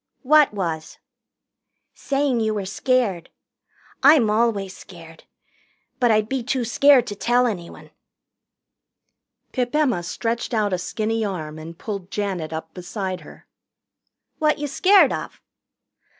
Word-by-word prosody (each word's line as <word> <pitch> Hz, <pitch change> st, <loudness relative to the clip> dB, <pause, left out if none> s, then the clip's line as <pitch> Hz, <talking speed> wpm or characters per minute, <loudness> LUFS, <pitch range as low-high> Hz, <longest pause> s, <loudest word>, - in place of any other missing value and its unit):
"What 300 Hz, +2 st, +5 dB
was?" 165 Hz, -6 st, -4 dB, 1.0 s
"Saying 275 Hz, -3 st, -1 dB
you 220 Hz, -1 st, 0 dB
were 200 Hz, -2 st, -3 dB
scared. 210 Hz, -3 st, 0 dB, 0.7 s
I'm 275 Hz, -6 st, +6 dB
always 210 Hz, -4 st, 0 dB
scared. 165 Hz, -3 st, -14 dB, 0.7 s
But 245 Hz, -2 st, +3 dB
I'd 215 Hz, -1 st, +2 dB
be 265 Hz, +2 st, -2 dB
too 245 Hz, +1 st, -1 dB
scared 270 Hz, +2 st, +5 dB
to 205 Hz, -, -6 dB
tell 245 Hz, +4 st, +2 dB
anyone." 180 Hz, -8 st, -5 dB, 1.6 s
Pip 250 Hz, 0 st, -2 dB
Emma 270 Hz, -12 st, +2 dB
stretched 230 Hz, +7 st, -3 dB
out 210 Hz, -3 st, +1 dB
a 180 Hz, -, 0 dB
skinny 220 Hz, +4 st, -2 dB
arm 160 Hz, -6 st, -5 dB
and 165 Hz, +1 st, -10 dB
pulled 200 Hz, -3 st, -6 dB
Janet 190 Hz, -6 st, -3 dB
up 160 Hz, 0 st, -6 dB
beside 185 Hz, +1 st, -5 dB
her. -, -, -15 dB, 0.9 s
"What 305 Hz, -1 st, +2 dB
you 295 Hz, -, -3 dB
scared 380 Hz, +8 st, +4 dB
of?" -, -, -6 dB
215 Hz, 125 wpm, -22 LUFS, 185-250 Hz, 1.6 s, I'm